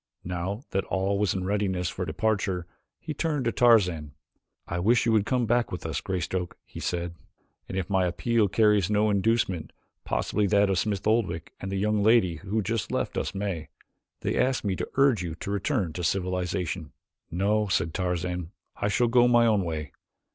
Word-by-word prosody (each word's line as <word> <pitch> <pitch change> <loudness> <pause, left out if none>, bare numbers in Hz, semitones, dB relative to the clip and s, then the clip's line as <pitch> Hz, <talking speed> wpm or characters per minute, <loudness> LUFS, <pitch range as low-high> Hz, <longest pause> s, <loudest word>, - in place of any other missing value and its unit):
Now 90 +6 -3
that 95 - 0
all 95 +1 0
was 100 -3 +1
in 95 - -2
readiness 95 -2 0
for - - -3
departure 100 -5 -1 0.3
he 155 - -5
turned 150 -5 -1
to 115 - +2
Tarzan. 90 -13 +3 0.5
"I 85 - -3
wish 115 +6 +3
you 115 - +3
would 110 -2 +2
come 125 -2 +1
back 120 +1 +1
with 90 - -5
us, 80 -2 -2
Greystoke," 90 -1 -3
he - - -10
said, 85 -1 -2 0.6
"and 95 - -4
if 95 -2 -1
my 95 -2 +2
appeal 115 +4 +1
carries 105 -2 +3
no 105 0 +3
inducement 100 -4 +1 0.3
possibly 105 0 0
that 100 0 +3
of 95 - +1
Smith 100 -1 -1
Oldwick 95 -8 0
and 95 - -5
the 100 - -1
young 105 +1 +1
lady 100 -6 +4
who 105 +5 -2
just 110 -1 -2
left - - -1
us - - -2
may. 95 -5 -3 0.5
They - - -1
asked 130 -3 +1
me 95 -2 0
to - - -4
urge 135 -7 +4
you 85 -3 -4
to 100 - -5
return 100 - -1
to 90 - -4
civilization." 90 -3 -2 0.4
"No;" 105 +4 +1
said 80 -4 0
Tarzan, 90 -2 -2 0.3
"I - - 0
shall 120 +4 +2
go 120 +1 +5
my 120 -1 +5
own 105 -4 +3
way. 75 -4 -4
100 Hz, 185 wpm, -27 LUFS, 90-110 Hz, 0.6 s, go